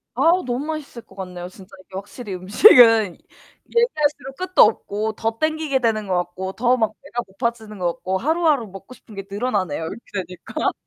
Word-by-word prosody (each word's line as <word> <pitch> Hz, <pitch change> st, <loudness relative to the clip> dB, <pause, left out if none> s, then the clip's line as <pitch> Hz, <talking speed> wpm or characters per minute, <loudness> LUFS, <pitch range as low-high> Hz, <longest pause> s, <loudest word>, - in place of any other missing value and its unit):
아우 335 Hz, +8 st, +3 dB
너무 255 Hz, +4 st, -3 dB
맛있을 300 Hz, -7 st, -6 dB
것 190 Hz, -, -19 dB
같네요. 180 Hz, -2 st, -7 dB
진짜 190 Hz, 0 st, -15 dB
이게 -, -, -21 dB
확실히 200 Hz, +1 st, -7 dB
음식은 220 Hz, -, +6 dB, 0.6 s
얘기할수록 300 Hz, -, 0 dB
끝도 370 Hz, 0 st, +3 dB
없고 215 Hz, 0 st, +1 dB
더 225 Hz, +1 st, -3 dB
당기게 310 Hz, -3 st, 0 dB
되는 220 Hz, -4 st, 0 dB
것 185 Hz, -, -1 dB
같고 180 Hz, +2 st, -3 dB
더 245 Hz, +3 st, +2 dB
막 220 Hz, -2 st, 0 dB
배가 245 Hz, -4 st, -4 dB
고파지는 220 Hz, +1 st, -4 dB
것 175 Hz, -2 st, -1 dB
같고 190 Hz, +2 st, -3 dB
하루하루 310 Hz, -, +1 dB
먹고 195 Hz, +5 st, -12 dB
싶은 225 Hz, -3 st, -15 dB
게 195 Hz, -1 st, -6 dB
늘어나네요. 200 Hz, -8 st, -2 dB
이렇게 205 Hz, +7 st, -7 dB, 0.3 s
되니까. 180 Hz, -1 st, -3 dB
225 Hz, 385 characters per minute, -21 LUFS, 190-270 Hz, 0.6 s, 음식은